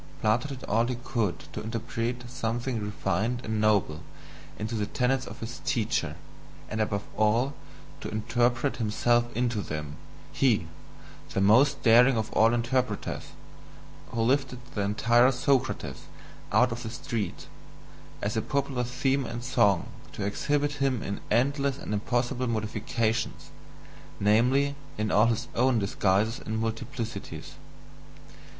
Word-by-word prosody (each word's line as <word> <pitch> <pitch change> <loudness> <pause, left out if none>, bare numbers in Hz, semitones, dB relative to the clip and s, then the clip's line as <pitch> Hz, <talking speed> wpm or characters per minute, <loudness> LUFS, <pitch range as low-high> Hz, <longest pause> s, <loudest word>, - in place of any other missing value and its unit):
Plato 110 +5 +2
did 135 -2 -7
all 115 +3 +1
he 125 - -1
could 115 - -2
to - - -4
interpret 115 +2 -3
something 120 -1 -2
refined 105 +3 -1
and 110 -1 -1
noble 100 -8 +2 0.6
into 110 +2 -4
the 105 -2 -1
tenets 130 0 0
of - - -9
his 115 +2 -6
teacher, 110 -2 0 0.5
and 110 0 -1
above 100 -1 -1
all 115 +6 +2 0.5
to - - -5
interpret 120 +4 +1
himself 120 +2 +2
into 120 -3 +1
them 75 -4 -5 0.3
he, 120 -10 +2 0.7
the - - +2
most 110 +9 +4
daring 120 +2 +6
of 110 -1 -2
all 110 +1 +5
interpreters, 120 +2 -1 0.8
who 115 -1 -1
lifted 130 +1 +1 0.2
the 105 - -1
entire 115 +5 +4
Socrates 130 +1 0 0.5
out 125 -1 +4
of 115 +1 -4
the 115 - -5
street, 115 -2 -4 0.8
as 105 +3 -1
a 110 - +1
popular 140 -2 -1
theme 135 +3 0
and 120 0 -5
song, 105 -7 +2 0.2
to 100 - -3
exhibit 145 +7 0
him 130 -4 +1
in 100 - -4
endless 140 +4 +2
and 105 - -5
impossible 120 +4 0
modifications 110 +1 -1 0.7
namely, 125 +7 +3 0.2
in 105 0 -1
all 105 +3 +5
his 115 +1 0
own 125 0 +3
disguises 100 +2 +1
and 110 +1 -2
multiplicities. 115 +1 -4
115 Hz, 130 wpm, -28 LUFS, 110-125 Hz, 0.8 s, daring